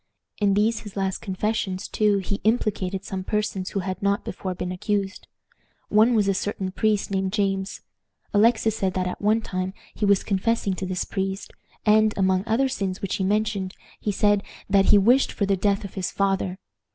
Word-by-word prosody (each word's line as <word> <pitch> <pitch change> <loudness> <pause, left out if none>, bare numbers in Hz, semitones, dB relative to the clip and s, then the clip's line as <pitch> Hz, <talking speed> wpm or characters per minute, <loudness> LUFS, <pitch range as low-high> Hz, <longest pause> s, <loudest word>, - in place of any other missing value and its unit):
In 200 -2 +3
these 220 +2 +2
his 205 -2 -10
last 190 -1 -1
confessions, 190 -1 -2
too, 210 -2 +2
he 195 +1 -3
implicated 200 -4 0
some 190 -1 -4
persons 205 -2 -2
who 195 - -2
had 185 0 -4
not 200 0 +1
before 185 -1 -4
been 180 +1 -4
accused. 200 +1 -2 0.6
One 220 +3 +5
was 210 -3 +3
a 195 - +3
certain 190 0 -3
priest 210 0 0
named 190 -1 -1
James. 195 -2 -1 0.5
Alexis 220 +1 +3
said 190 -4 -1
that 185 -1 0
at 180 - -4
one 215 +2 +3
time 185 -2 -3 0.2
he 210 - -1
was 200 -1 +4
confessing 200 0 0
to 190 - -3
this 180 -1 -2
priest, 195 0 -3 0.3
and, 215 0 +4
among 190 -1 +2
other 235 +5 +2
sins 195 -7 -3
which 195 -2 -2
he 190 - -1
mentioned, 205 -1 0 0.2
he 210 - -1
said 205 0 +3 0.3
"that 195 -1 +4
he 210 - +6
wished 245 +7 +4
for 205 - -1
the 195 0 +2
death 200 +2 +1
of 200 - -7
his 190 -2 -2
father." 195 -2 0
200 Hz, 190 wpm, -24 LUFS, 190-210 Hz, 0.6 s, he